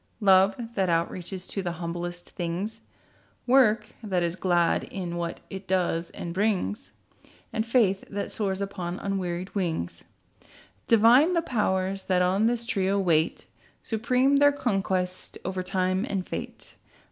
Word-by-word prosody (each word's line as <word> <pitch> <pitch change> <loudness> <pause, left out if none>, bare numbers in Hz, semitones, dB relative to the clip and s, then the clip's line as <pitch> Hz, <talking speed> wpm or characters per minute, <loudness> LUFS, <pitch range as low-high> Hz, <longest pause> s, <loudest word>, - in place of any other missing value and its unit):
Love, 195 -1 +5 0.2
that 190 -4 +1
outreaches 175 +2 -2
to 200 - -3
the 175 -2 -3
humblest 175 +1 -5
things; 190 +6 -4 0.6
Work 230 -5 +4
that 190 -5 0
is 170 0 -1
glad, 175 -2 +2
in 180 -3 -5
what 170 -1 -4
it 190 0 -7
does 175 -2 0
and 170 - -6
brings; 210 +4 -1 0.6
And 220 - 0
faith 215 -6 +2
that 200 0 -4
soars 195 -2 -2
upon 185 -3 -4
unwearied 185 -2 -3
wings. 165 - -2 0.8
Divine 240 +10 +6
the 335 -1 +1
Powers 195 - -1
that 180 -1 +2
on 195 +5 +2
this 235 0 0
trio 200 -3 +1
wait. 165 -4 +1 0.4
Supreme 250 +5 +2
their 285 0 +6
conquest, 190 -8 -1
over 190 -1 -2
Time 185 +1 0
and 190 -2 -2
Fate. - - -7
190 Hz, 135 wpm, -27 LUFS, 180-215 Hz, 0.8 s, Divine